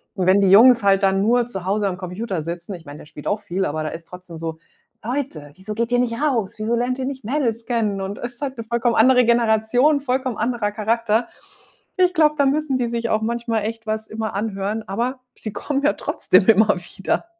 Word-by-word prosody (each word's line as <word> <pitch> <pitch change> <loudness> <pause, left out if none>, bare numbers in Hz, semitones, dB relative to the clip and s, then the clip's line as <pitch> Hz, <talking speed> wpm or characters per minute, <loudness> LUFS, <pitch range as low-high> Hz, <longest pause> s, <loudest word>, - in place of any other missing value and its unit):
und 185 -2 -1
wenn 190 +2 +5
die 195 - +4
Jungs 235 +4 +7
halt 195 0 +3
dann 195 0 +3
nur 240 +3 +3
zu 190 -6 -6
Hause 200 +1 0
am 180 -1 -3
Computer 185 0 -4
sitzen 170 +3 -6
ich 165 - -13
meine, 145 +1 -10
der - - -12
spielt 150 0 -10
auch 205 +1 -1
viel, 190 0 -2
aber 155 +1 -2
der 155 - -3
ist 165 0 -9
trotzdem 180 -2 -11
so: 160 -1 -4 0.5
„Leute, 230 - -4
wieso 195 +3 -7
geht 235 +1 -1
ihr 245 - +3
nicht 235 -2 0
raus? 240 -10 0
Wieso 220 +2 -2
lernt 250 +2 -1
ihr 260 - -2
nicht 265 -3 -5
Mädels 235 -4 -1
kennen“ 215 -5 -1
und 195 +1 -5
ist 240 +1 -7
halt 270 -3 -4
'ne 230 - -5
vollkommen 235 0 0
andere 250 +1 +5
Generation, 235 +5 +3
vollkommen 255 -3 -1
anderer 230 -2 -1
Charakter. 225 +1 0 0.7
Ich 365 -1 +3
glaube, 305 -1 +4
da 280 - +3
müssen 280 -1 0
die 240 -1 -1
sich 235 -1 -2
auch 215 0 +1
manchmal 230 -1 -1
echt 225 0 -5
was 220 0 -2
immer 220 -1 -4
anhören, 210 +1 -2
aber 240 +7 -2 0.2
sie 215 - -7
kommen 280 +5 -2
ja 295 - +3
trotzdem 190 - +2
immer 220 -1 +5
wieder. 180 - -3
225 Hz, 220 wpm, -21 LUFS, 195-245 Hz, 0.7 s, Jungs